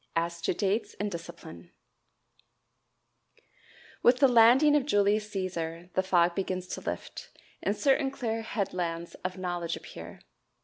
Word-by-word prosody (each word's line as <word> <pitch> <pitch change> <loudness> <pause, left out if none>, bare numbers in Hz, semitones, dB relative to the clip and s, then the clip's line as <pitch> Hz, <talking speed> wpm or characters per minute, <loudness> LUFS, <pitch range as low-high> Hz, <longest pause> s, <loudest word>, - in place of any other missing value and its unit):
As 170 0 -1
to 170 - 0
Dates 205 +3 -1
and 205 0 -2
Discipline. 165 - -9 2.3
With 245 +1 +5
the 275 - +6
landing 250 +5 +6
of 285 -2 +1
Julius 210 -2 +2
Cæsar 175 -3 -4
the 190 - +2
fog 175 -2 +3
begins 185 -1 -2
to - - -5
lift, - - -6 0.3
and 205 +1 -1
certain 270 +4 +2
clear 230 -4 -3
headlands 175 -6 -3
of 185 +1 -3
knowledge 175 -2 -2
appear. - - -10
190 Hz, 130 wpm, -29 LUFS, 170-225 Hz, 2.3 s, the